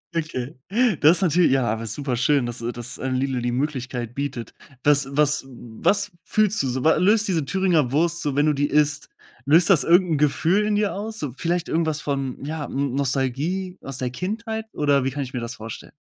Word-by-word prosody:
Okay. 150 -4 -3 0.5
Das 165 +5 +5
natürlich 175 -3 +3
ja, 135 -1 +3
aber 110 0 -2
ist 115 - -4
super 135 -4 -2
schön, 125 +1 +2
dass 120 0 -5
äh, 120 +1 -2
dass 120 0 -8
ein 130 -1 -2
Lidl 130 -1 -1
die 120 0 -1
Möglichkeit 130 -3 -3
bietet. 135 -3 -5 0.3
Was 145 -2 +4
was 150 0 +2
was 135 - -1
fühlst 215 -1 +1
du 135 - -1
so? 125 +1 -2
Wa 160 - +5
löst 210 +3 +3
diese 165 -7 0
Thüringer 175 -7 +1
Wurst 170 +4 +1
so, 145 -2 -2
wenn 145 +1 +3
du 150 - +3
die 145 +1 0
isst? 150 0 +1 0.4
Löst 165 +6 +5
das 150 -8 +5
irgend 175 +3 +4
'n 150 - +1
Gefühl 165 +8 +2
in 210 - +1
dir 205 -1 +1
aus? 215 +2 -5
So 140 -5 -4
vielleicht 170 +1 -1
irgendwas 160 -2 0
von, 135 -4 -3
ja, 150 -1 -4
ähm, 140 -1 -2
Nostalgie 140 +8 -1
aus 135 -2 -7
der 125 -2 -3
Kindheit, 220 - -4
oder 145 -2 +2
wie 135 - 0
kann 140 +1 -3
ich 125 - -9
mir 125 - -2
das 115 +1 -5
vorstellen? 110 0 -9
145 Hz, 215 wpm, -23 LUFS, 130-170 Hz, 0.5 s, Das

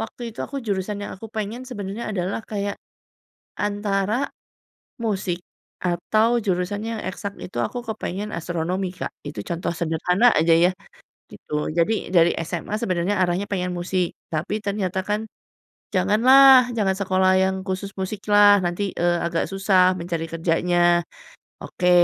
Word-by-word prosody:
waktu 230 +1 -6
itu - - -23
aku 280 - -5
jurusan 205 -1 -2
yang - - -6
aku 225 - -8
pengen 220 +3 -4
sebenarnya 210 -1 -5
adalah 185 0 -1
kayak, 200 -1 -3 0.8
antara 205 +3 -1 0.7
musik, 190 -5 -2 0.4
atau 215 +7 +2
jurusan 195 -1 -1
yang 225 -1 -3
eksak 200 +2 -5
itu 180 - -7
aku 120 - -3
kepengen 210 -2 -4
astronomi 175 +2 -2
Kak, - - -4 0.2
itu 145 -8 -5
contoh 170 0 -3
sederhana 180 +8 +2
aja 165 +2 +4
ya, 175 +2 +4 0.6
gitu. 150 0 -4
Jadi, 175 +4 0
dari 170 -1 +5
SMA 170 +5 -3
sebenarnya 185 -1 0
arahnya 180 +2 0
pengen 180 -3 -2
musik, 180 0 -1 0.2
tapi 180 +7 -2
ternyata 195 -2 -2
kan, 210 +1 0 0.7
"Jangan 200 +4 +2
lah, 265 -1 +8
jangan 200 -4 +2
sekolah 185 -1 +2
yang 190 0 +1
khusus 190 +1 -3
musik 190 +2 -4
lah, 205 -1 +7
nanti, 180 +3 -1
eee, 175 0 +1
agak 170 0 0
susah 190 -1 +3
mencari 170 -2 -3
kerjanya." 175 +1 +2 0.6
Oke, 180 -1 -1
190 Hz, 140 wpm, -23 LUFS, 175-210 Hz, 0.8 s, lah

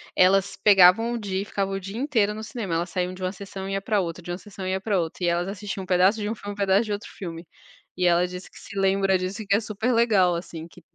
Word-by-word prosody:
elas 195 +2 +3
pegavam 205 +3 +6
o 240 - -2
dia 195 -2 -2
e - - -11
ficavam 195 -1 -2
o - - -2
dia 195 +2 -8
inteiro 230 -5 +1
no 215 +1 -7
cinema, 215 -5 -5
elas 170 +1 -1
saíam 180 +1 -2
de 185 - -11
uma 185 - -1
sessão 195 0 -7
e 195 - -3
ia 195 - -1
pra 210 0 +1
outra, 170 0 -5
de 175 - -6
uma 175 - -3
sessão 200 -2 -9
e 185 - -1
ia 190 - -1
pra 200 -2 +1
outra 165 +2 -4
e - - +2
elas 175 +1 0
assistiam 195 0 -5
um - - -9
pedaço 185 +4 +3
de 205 - -2
um 215 - -1
filme 205 -2 -7
um - - -12
pedaço 200 +2 +3
de 215 - -5
outro 205 0 -4
filme. 170 -2 -7 0.5
E 180 - 0
ela 175 +1 +4
disse 180 +1 -9
que - - -17
se - - -11
lembra 195 0 +2
disso 185 +4 -4
e - - -14
que 200 - +3
é - - +3
super 220 +3 -2
legal 210 -7 +4
assim 170 -1 -6
que 175 - -17
195 Hz, 295 wpm, -25 LUFS, 180-205 Hz, 0.5 s, pegavam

